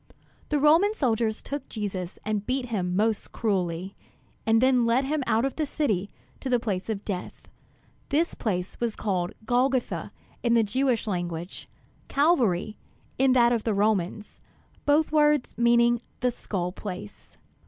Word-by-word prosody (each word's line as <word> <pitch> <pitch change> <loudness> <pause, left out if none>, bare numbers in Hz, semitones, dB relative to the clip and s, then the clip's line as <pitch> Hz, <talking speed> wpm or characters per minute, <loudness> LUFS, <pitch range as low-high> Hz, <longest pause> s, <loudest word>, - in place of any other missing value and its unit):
The 295 - +2
Roman 330 +9 +5
soldiers 230 - 0
then - - -12
took 270 - -29
Jesus 190 -5 -4
and 210 -1 -1
beat 255 -1 -1
him 180 -5 -1
most 215 +2 0
cruelly; 190 -3 -1 0.5
and 225 0 +5
then 255 0 +4
led 240 +3 +3
him 295 +1 -1
out 225 +3 +2
of 270 - -3
the 310 - +1
city 210 - -1 0.3
to 265 - -4
the 245 -1 +3
place 205 -4 -3
of 205 -2 -3
death. 185 -3 -5 0.6
This 320 +4 +2
was - - -18
a - - -12
place 180 -5 -2 0.2
called 185 -4 -1
"Golgotha" 250 +2 0 0.3
in 235 -1 +2
the 230 - +5
Jewish 250 +2 0
language, 175 -3 -4 0.4
"Calvary" 235 - +2 0.4
in 265 -1 +5
that 240 -2 +5
of 230 - +1
the 220 -3 0
Romans; 205 0 -1 0.5
both 300 +2 +3
words 300 -3 +3
meaning 235 0 +4 0.2
"The 250 0 +2
Skull 180 -6 -3
Place." 200 +1 -9
225 Hz, 155 wpm, -26 LUFS, 200-260 Hz, 0.6 s, Roman